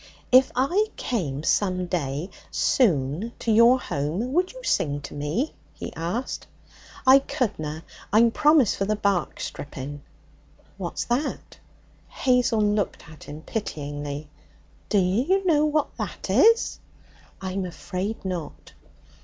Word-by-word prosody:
'If 255 +1 +6
I 345 - +2
came 150 - -2
some 185 0 +1
day 160 -1 -3 0.2
soon 175 - +1
to 230 - -1
your 235 +4 +6
home, 175 - -2
would 360 +3 +2
you - - -12
sing 150 - +1
to - - -9
me?' 150 - -2 0.2
he - - -7
asked. 175 +10 -3 0.6
'I 260 +1 +8
couldna. 160 - -3 0.3
I'm 230 +3 +5
promised 295 -4 +4
for 195 - 0
the 215 +1 +1
bark 200 -5 0
stripping.' 145 0 -6 0.8
'What's 180 -3 -3
that?' 245 +5 -2 0.5
Hazel 250 -4 +2
looked 205 -3 -1
at 155 -2 -13
him 150 +2 -9
pityingly. 145 -7 -4 0.6
'Dunna 200 -3 +3 0.3
you 385 0 +3
know 305 -4 +4
what 305 0 0
that - - -4
is?' 460 +1 +4 0.6
'I'm 190 0 -3
afraid 185 +5 -5
not.' 180 -5 -5
200 Hz, 125 wpm, -25 LUFS, 155-255 Hz, 0.8 s, I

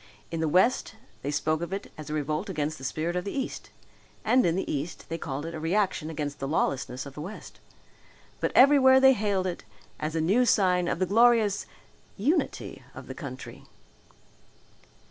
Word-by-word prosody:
In 165 - -3
the 160 -1 0
west 220 +7 +2 0.3
they 140 - -3
spoke 155 +2 0
of 170 - -4
it 195 +1 -5
as 155 0 -9
a - - -3
revolt 155 +6 -2
against 155 -3 -2
the - - -11
spirit 160 +6 -2
of 180 - -1
the 200 - -5
east 265 - -4 0.6
and 255 0 +4
in 165 - +1
the 190 - -1
east 150 +4 -5
they 165 - -3
called 145 0 -4
it 165 - -5
a 160 - -5
reaction 170 -1 0
against 145 -2 -4
the 135 - -3
lawlessness 135 -3 -1
of 140 - -9
the 150 - -7
west. 195 +7 -9 0.8
But - - 0
everywhere 265 -1 +7
they 265 0 +7
hailed 200 -4 0
it 180 -2 -4 0.4
as 155 +1 -3
a - - +1
new 195 +10 +3
sign 185 -6 +3
of - - 0
the 185 - +1
glorious 225 0 +3 0.5
unity 285 - -1
of - - -9
the - - -7
country. - - -9
175 Hz, 185 wpm, -27 LUFS, 155-210 Hz, 0.8 s, everywhere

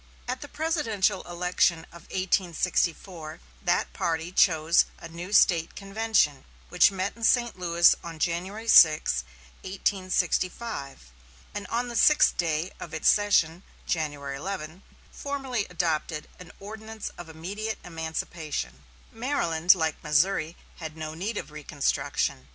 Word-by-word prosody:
At 255 +1 -3
the 290 - -7
presidential 285 - 0
election 175 -1 +1
of 170 -1 -15
1864, 175 -2 -1 0.2
that - - 0
party 165 +1 -2
chose 165 -3 +4
a - - -9
new 170 +3 -8
State 170 -5 +4
convention, 195 -9 +1 0.3
which 180 -1 +5
met 195 +1 -3
in 230 - -11
St. 240 -4 +2
Louis 170 -1 +5
on 165 -1 -7
January 185 +7 -2
6, 155 - +6 0.4
1865, 185 - -2 0.4
and 205 -2 -5
on 240 +4 -1
the 240 - -6
sixth 300 +5 +5
day 165 +1 -1
of 160 - -7
its 160 - +3
session 180 -5 +3 0.2
(January 145 -4 -3
11) 175 +1 -6 0.3
formally 270 -6 -3
adopted 165 -3 -2
an 180 -3 -11
ordinance 220 +1 -7
of 175 -2 -10
immediate 200 +7 -5
emancipation. 160 - -5 0.3
Maryland, 180 - +2
like 160 -3 -2
Missouri, 160 +2 +1 0.2
had 160 -2 -7
no 155 0 -5
need 200 +7 -4
of - - -6
reconstruction. 145 - -2
175 Hz, 125 wpm, -27 LUFS, 160-205 Hz, 0.4 s, 6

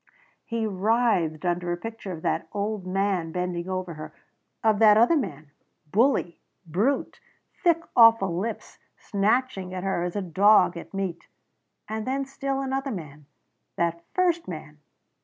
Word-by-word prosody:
He 230 -1 -2
writhed 200 -5 +1
under 175 0 0
a 175 - -1
picture 225 0 -7
of 160 -3 -7
that - - -1
old 205 -2 -3
man 190 -3 0
bending 180 0 -3
over 185 -2 -3
her 155 0 -8 0.5
of 215 -2 +3
that 215 -1 +7
other 240 +9 +5
man 155 - -3 0.4
bully, 220 -6 +2 0.3
brute 205 - 0 0.4
thick 335 -2 +3
awful 225 -7 +6
lips 215 +5 -5 0.2
snatching 200 -2 0
at 185 - -4
her 190 -3 0
as 175 +1 -3
a 205 - -1
dog 185 +1 +4
at 170 - -9
meat. 190 -3 -4 0.6
And 220 +1 -4
then 270 +1 -1
still 275 0 -3
another 270 +1 -2
man. 150 - -8 0.5
That 170 0 -1
first 350 -2 +1
man. 155 -3 -8
195 Hz, 145 wpm, -26 LUFS, 175-230 Hz, 0.6 s, that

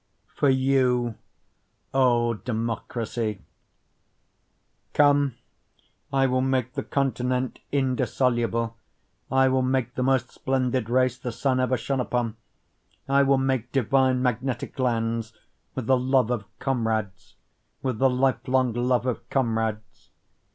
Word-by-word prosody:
For 145 - +2
You, 130 -3 +2 0.8
O 120 -3 +3
Democracy 115 -1 -3 1.5
Come, 145 -3 +4 0.8
I 135 -1 +3
will 130 0 +1
make 130 -1 0
the - - -2
continent 130 -2 -1
indissoluble, 120 -3 0 0.5
I 135 0 +4
will 130 0 +2
make 130 -1 0
the - - -3
most 130 -2 +1
splendid 130 -3 -1
race 130 0 +2
the 125 - -4
sun 130 +2 0
ever 130 0 +1
shone 135 +4 -2
upon, 120 -2 -1 0.7
I 140 +1 +4
will 135 0 +4
make 130 -2 -1
divine 130 0 +2
magnetic 125 +2 -2
lands, 115 -2 -1 0.4
With 130 - -3
the 130 +1 +3
love 130 -2 +2
of 115 -4 -2
comrades, 110 -7 -2 0.5
With 130 -5 -2
the 135 - +5
life 125 -2 0
long 130 -2 +2
love 125 +1 +1
of 125 -2 -3
comrades. 110 -3 -2
125 Hz, 120 wpm, -25 LUFS, 115-130 Hz, 1.5 s, the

